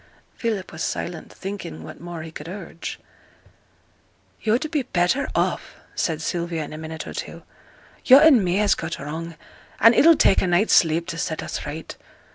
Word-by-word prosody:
Philip 215 -5 -3
was 160 - -8
silent, 170 -2 -4
thinking 190 - -7
what 80 - -10
more 170 -2 -7
he 160 - -9
could 155 0 -9
urge. 185 -3 -7 1.4
'Yo'd 230 +7 +1 0.3
better 180 +11 +2
be - - -9
off,' - - -1 0.2
said 160 -2 -2
Sylvia, 170 -2 -2
in 150 - -8
a - - -7
minute 160 0 -6
or - - -7
two. - - -7 0.6
'Yo' 260 - +9
and 285 -7 +6
me 180 0 0
has 205 0 +3
got 165 0 -4
wrong, 160 +4 -6 0.4
and 230 +1 +7
it'll 330 +6 +7
take 195 - +4
a - - 0
night's 175 +5 +3
sleep 165 0 +4
to 170 -2 -5
set 160 -1 -3
us - - -5
right. 155 +2 -7
175 Hz, 175 wpm, -23 LUFS, 160-205 Hz, 1.4 s, Yo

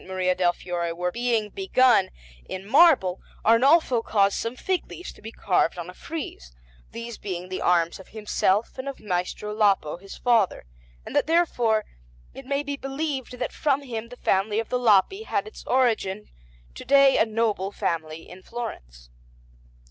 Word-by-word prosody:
Maria 185 -1 0
del 180 -1 +2
Fiore 175 -1 -4
were 180 +1 -2
being 235 -1 0
begun 260 - +3 0.4
in 190 +1 -6
marble 265 - +5 0.2
Arnolfo 255 +2 +4
caused 200 -3 +2
some 230 +2 -3
fig 375 +6 -2
leaves 355 - -8
to - - -19
be 220 - -8
carved 180 -6 +1
on 175 +1 -6
a - - -17
frieze, 290 - -7 0.4
these 235 -1 -8
being 185 -2 -5
the 185 - -4
arms 170 -1 +2
of 190 - -13
himself 210 +1 -1
and 270 +2 -4
of 275 - -8
Maestro 200 +1 -3
Lapo, 200 -7 +2
his 195 +2 -11
father, 230 - +2 0.4
and - - -8
that - - +2
therefore 245 -10 +2 0.5
it 270 -1 -11
may 280 +1 0
be 285 0 -3
believed 270 -2 -4
that 250 - -3
from 285 -1 0
him 230 -3 -6
the 245 - -11
family 205 +1 +1
of 225 - -4
the 250 - 0
Lapi 235 - +3
had 445 - -2
its 435 - -11
origin, 220 -6 +1 0.5
to - - -9
day 275 0 +5
a - - +5
noble 215 -3 -1
family 160 -3 -3
in 180 +1 -12
Florence. - - -8
220 Hz, 170 wpm, -25 LUFS, 185-260 Hz, 0.5 s, marble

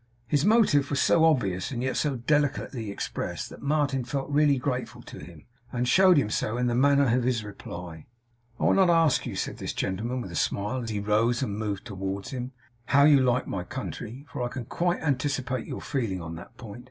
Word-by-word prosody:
His 140 +3 +1
motive 205 -10 +4
was 140 - 0
so 165 - +4
obvious, 100 - +1
and 125 -3 -3
yet 130 -1 -1
so 145 -3 0
delicately 135 -3 0
expressed, 100 - -4
that - - -11
Martin 140 -2 0
felt 135 +2 -4
really 145 -1 +4
grateful 125 -1 -3
to - - -10
him, 75 0 -12 0.3
and 125 0 -1
showed 185 +6 +6
him 140 - +3
so 110 +2 -1
in 125 - 0
the 120 - +1
manner 140 -1 +4
of 125 - +1
his 120 -3 0
reply. 90 -5 -9 0.5
'I - - -3
will - - +4
not 190 -2 +4
ask 165 -4 +3
you,' - - -5
said - - -3
this - - -4
gentleman 115 +7 -2
with 95 -7 -6
a - - -7
smile, 105 +9 -1
as 115 - -5
he 105 -2 -2
rose 110 +5 +1
and 105 -6 -3
moved 105 -2 -3
towards 95 -1 -5
him, 125 -1 -5 0.3
'how 140 +1 +4
you 145 -1 +7
like 125 -1 +2
my 90 - -4
country, 125 +2 -7
for - - -4
I 120 - 0
can 125 -1 -6
quite 175 +8 -1
anticipate 135 -3 -1
your - - -5
feeling 115 -9 -2
on 80 -1 -7
that 85 - -11
point. 110 -1 -9
125 Hz, 215 wpm, -27 LUFS, 105-140 Hz, 0.5 s, you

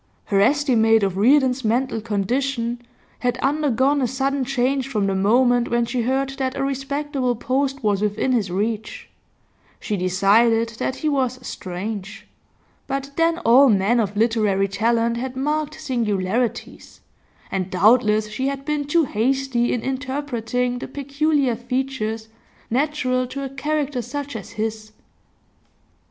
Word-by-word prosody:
Her 195 -1 +2
estimate 225 -4 +3
of 195 -2 0
Reardon's 260 +4 +3
mental 230 +1 0
condition 235 +3 -1 0.4
had 245 0 0
undergone 280 0 +1
a 255 - +2
sudden 270 +2 -1
change 265 +1 0
from 215 -7 -1
the 195 - 0
moment 240 +5 +3
when 235 0 +1
she 245 +1 -2
heard 265 +3 0
that 260 0 -2
a 275 - -1
respectable 275 -1 -2
post 270 +3 -1
was 205 -2 +1
within 210 +5 0
his 220 -6 +1
reach; 220 - -3 0.7
she 210 - -3
decided 205 +5 +3
that 260 - -1
he 310 - -3
was 260 -4 0
'strange,' 200 +3 -6 0.6
but 275 0 -3
then 330 0 +2
all 255 +4 +7
men 210 +3 +3
of 205 -2 -1
literary 215 -3 +2
talent 230 +3 +1
had 255 +1 -4
marked 305 +2 -2
singularities, 230 -5 -2 0.5
and 190 -1 -2
doubtless 215 +2 +3
she 215 +6 -3
had 275 0 -4
been 300 -1 -1
too 325 +3 +3
hasty 255 0 0
in 245 - -1
interpreting 255 -3 -2
the - - -6
peculiar 280 -1 0
features 240 -3 -3 0.4
natural 255 -1 0
to 275 +2 -5
a 270 - -4
character 285 -1 -2
such 285 +3 -6
as 205 -5 -7
his. 215 0 -4
245 Hz, 140 wpm, -22 LUFS, 220-275 Hz, 0.7 s, all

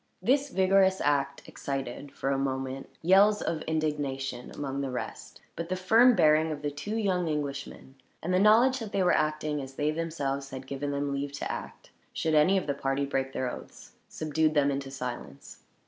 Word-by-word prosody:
This 280 +3 +2
vigorous 190 -2 +3
act 140 -1 0
excited, 135 0 -5
for 135 - -2
a 135 - +1
moment, 135 0 -3
yells 200 +4 +5
of 165 -2 -2
indignation 140 -5 -2
among 140 -1 -4
the 135 - -2
rest; 125 - -6
but 170 +1 -5
the 185 - 0
firm 225 +7 +5
bearing 155 -1 +4
of 150 -1 -6
the 145 - -1
two 205 +10 -5
young 185 -6 0
Englishmen, 140 -3 -4 0.3
and 180 +3 -1
the 185 - +4
knowledge 235 +6 +5
that 220 -3 -7
they 195 - +2
were 180 - +4
acting 155 -1 0
as 135 0 -9
they 150 +2 0
themselves 145 -4 -3
had 130 -1 -7
given 140 +1 -4
them 140 0 -1
leave 140 0 -3
to 145 - -4
act, - - -8 0.2
should 160 - -1
any 155 +6 +5
of 185 - -1
the 145 - 0
party 135 0 -1
break 135 -1 -2
their 130 -1 -2
oaths, - - -11 0.2
subdued 155 0 0
them 145 -1 +3
into 135 0 -3
silence. 125 - -7
145 Hz, 190 wpm, -28 LUFS, 135-180 Hz, 0.3 s, yells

